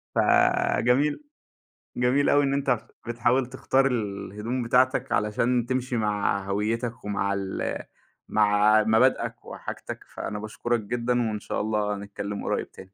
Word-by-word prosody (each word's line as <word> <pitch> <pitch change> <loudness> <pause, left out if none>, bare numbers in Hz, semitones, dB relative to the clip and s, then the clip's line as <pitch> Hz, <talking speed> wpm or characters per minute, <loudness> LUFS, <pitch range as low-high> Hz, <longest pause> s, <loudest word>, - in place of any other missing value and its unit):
فجميل 125 - +3 0.7
جميل 125 +3 +2
أوي 145 0 +4
إن 135 0 +1
أنت 135 -4 +1 0.3
بتحاول 120 +2 +1
تختار 130 +1 +1
الهدوم 105 0 -2
بتاعتك 125 +2 +2
علشان 115 +3 +1
تمشي 130 0 -1
مع 105 -2 0
هويّتك 115 +4 -2
ومع 100 -1 -1
ال 95 -1 -3 0.5
مع 105 0 +4
مبادئك 110 +4 +2
وحاجتك. - - -7
فأنا 105 - -6
باشكُرك 115 +2 -2
جدًا 120 +3 -1
وإن 105 -1 -4
شاء - - -3
الله 105 -1 0
نتكلّم 100 0 -6
قريّب - - -2
تاني. 95 0 -13
115 Hz, 125 wpm, -26 LUFS, 105-125 Hz, 0.7 s, أوي